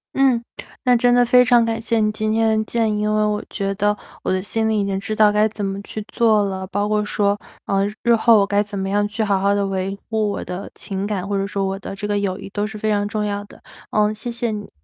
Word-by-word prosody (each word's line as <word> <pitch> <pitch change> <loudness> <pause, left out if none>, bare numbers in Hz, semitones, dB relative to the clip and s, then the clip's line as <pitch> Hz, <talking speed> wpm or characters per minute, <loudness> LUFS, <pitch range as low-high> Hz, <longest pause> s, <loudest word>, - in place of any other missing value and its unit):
嗯， 260 -4 +3 0.4
那 250 -1 +5
真 245 +1 +3
的 245 0 +5
非 250 +1 +5
常 240 -2 +5
感 225 0 -1
谢 225 0 0
你 215 0 +2
今 215 0 -1
天 220 0 +2
的 215 - 0
建 225 -2 0
议。 - - -1
因 210 0 +1
为 215 0 +2
我 210 0 0
觉 195 -2 -2
得 210 +1 +1 0.3
我 - - 0
的 185 0 +1
心 220 +2 0
里 215 -1 +1
已 - - +1
经 195 -1 -1
知 215 +2 -4
道 215 -1 +5
该 210 +1 +3
怎 210 -1 -6
么 195 0 -2
去 215 0 -6
做 220 -3 +3
了， 190 -1 -4
包 205 +1 -1
括 210 0 +1
说， 205 -1 +1 0.3
呃， 195 0 +1 0.2
日 235 -1 +4
后 225 -1 +5
我 200 - +3
该 205 +1 +2
怎 205 -1 -7
么 195 0 -2
样 205 +1 +1
去 215 +1 -2
好 200 -2 +1
好 200 +1 +2
地 200 -1 +1
维 195 0 -2
护 215 -2 0
我 - - -4
的 180 +2 -6
情 195 0 -4
感， 200 -2 -3
或 200 -1 -1
者 195 - 0
说 200 -1 -2
我 195 0 -2
的 195 - -7
这 205 +1 -4
个 205 0 0
友 200 -1 -2
谊 195 - -8
都 205 +1 -2
是 215 0 -7
非 215 +1 -1
常 205 -1 +1
重 210 0 -2
要 205 0 -2
的。 - - -17 0.3
呃， 210 0 +2
谢 235 +3 -5
谢 235 0 -2
你。 210 -1 -6
210 Hz, 300 characters per minute, -21 LUFS, 200-220 Hz, 0.4 s, 那